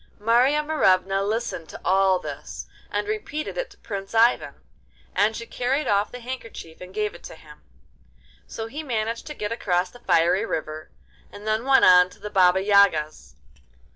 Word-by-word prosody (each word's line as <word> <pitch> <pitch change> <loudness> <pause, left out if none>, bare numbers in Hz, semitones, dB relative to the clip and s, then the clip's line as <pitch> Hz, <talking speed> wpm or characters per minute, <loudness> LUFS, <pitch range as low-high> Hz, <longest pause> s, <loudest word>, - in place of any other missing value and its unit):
Marya 245 +7 +3
Morevna 195 -10 +2
listened 210 -5 -3
to - - -10
all 190 0 +3
this, - - -8 0.2
and - - -2
repeated 420 -8 -4
it - - -3
to - - -19
Prince 200 0 -7
Ivan, 230 +2 +3 0.6
and 215 +2 +2
she 230 - -6
carried 260 +6 -1
off 200 0 +1
the 250 - -9
handkerchief 230 -10 -8
and 180 0 -10
gave 210 +1 -2
it - - -13
to - - -9
him. - - -16 0.9
So 225 - -6
he 280 +7 -6
managed 230 -5 -3
to 300 - -7
get 210 -3 -4
across 180 -5 -1
the 245 - -15
fiery 175 -1 +2
river, 155 -6 -5 0.4
and 205 +1 -11
then 215 +2 -1
went 270 0 +5
on 180 0 +7
to - - -18
the 210 - -7
Baba 190 -1 +4
Yaga's. 155 - +2
210 Hz, 170 wpm, -24 LUFS, 185-245 Hz, 0.9 s, on